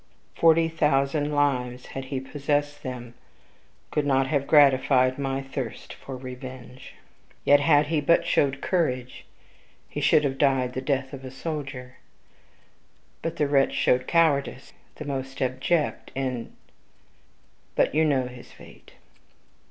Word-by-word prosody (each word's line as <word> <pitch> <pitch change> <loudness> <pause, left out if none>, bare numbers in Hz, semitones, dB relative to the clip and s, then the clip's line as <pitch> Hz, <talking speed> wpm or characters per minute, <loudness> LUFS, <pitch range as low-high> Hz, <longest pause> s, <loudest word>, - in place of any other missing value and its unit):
Forty 165 0 +4
thousand 150 -2 +1
lives, 125 -4 0
had 135 0 -5
he 130 0 -3
possessed 145 +2 -2
them, 120 -2 -7 0.8
could 150 - 0
not 135 -1 +2
have 140 0 -1
gratified 130 -2 +4
my 135 0 -2
thirst 135 -3 -6
for 135 -1 -9
revenge. 130 0 -10 0.5
Yet, 145 0 +6
had 145 0 +4
he 155 0 0
but 170 +4 +3
showed 135 -1 +1
courage, 130 -9 -1 0.6
he - - -5
should 150 - +4
have 135 -1 -2
died 130 -3 +2
the 130 - -3
death 135 -1 -2
of 135 -1 -8
a 130 - -7
soldier. 135 -3 -6 1.2
But 165 0 -3
the 150 - +1
wretch 140 -1 +2
showed 125 0 +2
cowardice 145 -6 +1 0.2
the 150 - -8
most 135 -1 -5
abject, 130 +5 -1
and 130 -3 -3 1.2
,but - - +2
you 155 +2 +3
know 140 -5 +2
his 125 -1 -11
fate. - - -16
135 Hz, 135 wpm, -25 LUFS, 130-145 Hz, 1.2 s, Yet